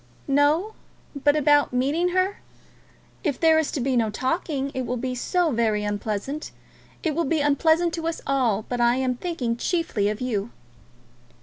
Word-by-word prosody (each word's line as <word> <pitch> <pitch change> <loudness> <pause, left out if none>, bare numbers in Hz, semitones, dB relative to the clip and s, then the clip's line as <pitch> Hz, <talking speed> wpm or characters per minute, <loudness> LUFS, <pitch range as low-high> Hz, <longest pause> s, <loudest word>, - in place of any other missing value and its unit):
"No; 295 +9 +2 0.4
but 290 +1 +2
about 290 -2 +3
meeting 285 +8 +1
her? 370 +2 0 0.8
If 295 -7 -1
there 320 -1 +5
is 315 - 0
to - - -1
be 260 +1 0
no 230 -2 +2
talking 275 - -2
it 260 - -2
will 250 - -2
be 255 +1 -3
so 335 +7 0
very 220 -3 +1
unpleasant. 210 +7 -3 0.5
It 320 - 0
will 335 +3 0
be 315 +2 0
unpleasant 320 +4 +2
to 330 -1 -3
us 330 - -2
all, 240 -7 +1
but 245 -1 -2
I 240 0 +4
am 260 -1 0
thinking 245 -6 -3
chiefly 245 - 0
of 210 +1 -3
you." 230 -4 -2
275 Hz, 170 wpm, -24 LUFS, 240-320 Hz, 0.8 s, there